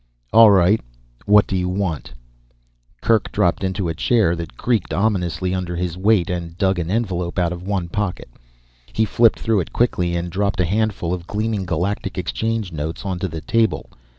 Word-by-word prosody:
"All 115 -1 +9
right, 100 +2 +4 0.5
what 105 0 +6
do 95 - -3
you 90 -1 0
want?" 90 -5 -3 0.9
Kerk 115 -2 +2
dropped 90 +2 +1
into 95 -1 -1
a 80 - -1
chair 100 0 +2
that 85 -7 -7
creaked 115 -6 0
ominously 95 -3 0
under 90 -2 -3
his 85 -1 -2
weight, 95 -1 +2
and 85 -1 -4
dug 95 -2 +1
an 85 0 -3
envelope 95 -5 -2
out 90 -1 +1
of 85 - -7
one 95 -2 -2
pocket. 100 +1 -3 0.7
He 110 - +2
flipped 115 +1 +3
through 110 -2 +1
it 90 - -4
quickly 90 -8 +1
and 85 0 -3
dropped 100 +1 -1
a 90 - +3
handful 100 -2 -1
of 90 -1 -5
gleaming 105 -2 -2
Galactic 95 +4 -2
Exchange 110 +2 -2
notes 80 +3 -5
onto 95 -1 -2
the 80 -2 -6
table. 115 +7 0
95 Hz, 180 wpm, -21 LUFS, 85-105 Hz, 0.9 s, All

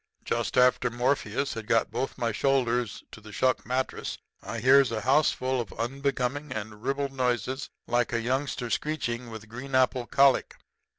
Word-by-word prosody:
"Just - - -1
after 125 0 +4
Morpheus 125 +1 0
had 115 -3 -7
got 115 - +2
both 125 +4 -3
my 120 -2 0
shoulders 125 -2 0
to 110 - -11
the 105 0 -12
shuck 130 +4 +1
mattress 130 +1 -2 0.2
I 115 - -5
hears 130 +3 +5
a 110 -1 -2
houseful 130 0 +2
of 115 - -8
unbecoming 135 +3 -2
and 110 -2 -6
ribald 140 0 -1
noises 130 +1 -1 0.2
like 120 0 +1
a 115 - +1
youngster 125 0 -2
screeching 125 -6 -2
with 110 -1 -9
green 130 +4 -6
apple 130 -1 +2
colic. 135 -1 +3
125 Hz, 160 wpm, -27 LUFS, 115-135 Hz, 0.2 s, hears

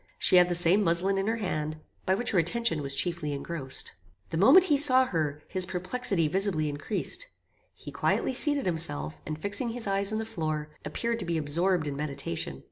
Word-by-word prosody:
She 185 - +3
had 180 0 +5
the 175 - 0
same 175 +4 +4
muslin 190 +3 +1
in 195 - -2
her 225 - 0
hand, 155 -8 -3 0.3
by 190 - +3
which 240 +5 -2
her 190 - +2
attention 170 0 -1
was 140 -1 -3
chiefly 170 -2 -1
engrossed. 140 -2 -5 0.4
The 165 - -2
moment 275 - +7
he 305 -6 +3
saw 260 -2 +7
her, 155 - -3
his 185 -1 +2
perplexity 185 0 -1
visibly 175 -3 0
increased. 150 - -1 0.5
He - - -10
quietly - - 0
seated 285 +1 +1
himself, 80 - -2
and 155 0 -5
fixing 205 - -3
his 230 0 -2
eyes 195 +1 +1
on 215 - -1
the 220 - -3
floor, 155 -8 -4
appeared 230 +10 -3
to 195 - -5
be 170 -1 -1
absorbed 165 +3 0
in 145 -1 -4
meditation. 140 - -3
180 Hz, 195 wpm, -28 LUFS, 155-215 Hz, 0.5 s, moment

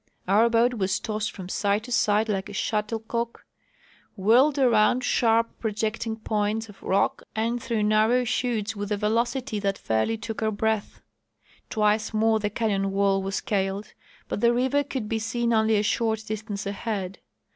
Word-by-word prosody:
Our 215 +5 +4
boat 235 +2 +3
w^as 195 -4 -1
tossed 215 0 -3
from 185 -3 -8
side 200 +2 0
to 245 - -9
side 215 -1 +2
like 205 -1 -2
a - - -8
shuttlecock, 225 +3 -2 0.7
whirled 240 +9 +4
around 245 -1 +3
sharp 230 -1 +2
projecting 220 +1 -2
points 220 0 -1
of 195 -1 -15
rock 195 - +1
and 230 +2 -1
through 225 -3 -1
narrow 215 +4 +3
chutes 225 -3 -1
with 205 0 -5
a 210 - +1
velocity 235 +3 0
that 195 -1 -1
fairly 110 - 0
took 220 +1 -6
our 220 - +2
breath. 220 0 -2 0.7
Twice 215 0 +1
more 220 0 +3
the 205 -1 -1
canyon 200 -2 0
wall 195 0 +2
was 195 0 -3
scaled, 195 -2 -2 0.3
but - - -3
the 235 0 +4
river 260 +4 +2
could 260 -6 -4
be 220 +1 -1
seen 235 +1 -1
only 220 0 +3
a 205 - +1
short 220 0 0
distance 215 -1 -5
ahead. 200 -2 -4
220 Hz, 165 wpm, -25 LUFS, 205-230 Hz, 0.7 s, Our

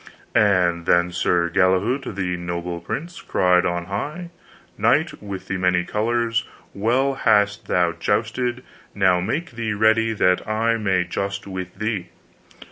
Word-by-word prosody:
And 90 -5 +2
then 85 0 +3
Sir 85 -1 +1
Galahault 95 +7 +1
the 90 -2 -1
noble 85 0 -4
prince 165 - -6
cried 90 0 +2
on 85 -1 -2
high, 150 - -5 0.4
Knight - - +1
with 100 -2 -7
the 95 - -2
many 90 -1 +2
colors, 115 +3 0 0.3
well 125 +7 +1
hast 105 -5 +2
thou 90 -1 +2
justed; 115 +8 -1 0.3
now 95 -3 +3
make 140 - -2
thee 115 -3 -3
ready 110 +2 +3
that 90 -3 +1
I 115 +2 +1
may 95 -4 +1
just 100 +3 -4
with 95 -2 -6
thee. 105 -3 -3
100 Hz, 135 wpm, -22 LUFS, 90-115 Hz, 0.4 s, then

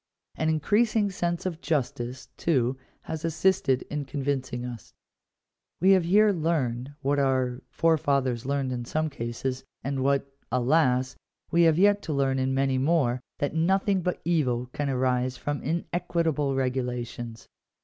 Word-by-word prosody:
An 160 - -1
increasing 205 +6 +2
sense 175 -2 -2
of 175 -3 -3
justice, 130 -4 -2
too, 130 -6 +1 0.3
has 160 -1 -5
assisted 165 -5 +2
in 150 -1 -4
convincing 135 -3 -3
us. 120 -3 -9 0.8
We 190 +2 +5
have 185 -3 +5
here 210 +4 +5
learned, 145 -7 -1
what 140 +1 +2
our 130 -2 +1
forefathers 140 -7 +1
learned 135 -1 -1
in 120 -1 -3
some 155 +5 -1
cases, 130 +1 -4 0.2
and 135 0 -1
what, 140 0 +2 0.3
alas! 130 0 +2 0.4
we 170 - +4
have 160 - +1
yet 205 +2 +4
to 160 - -3
learn 135 -1 +1
in 130 0 0
many 135 0 +1
more, 135 -4 +2 0.2
that 145 - -1
nothing 190 +4 +2
but 180 +1 -2
evil 130 -8 +1
can 145 -1 -2
arise 130 -1 0
from 145 +2 -3
inequitable 165 -3 -1
regulations. 125 -3 -3
140 Hz, 140 wpm, -27 LUFS, 130-165 Hz, 0.8 s, We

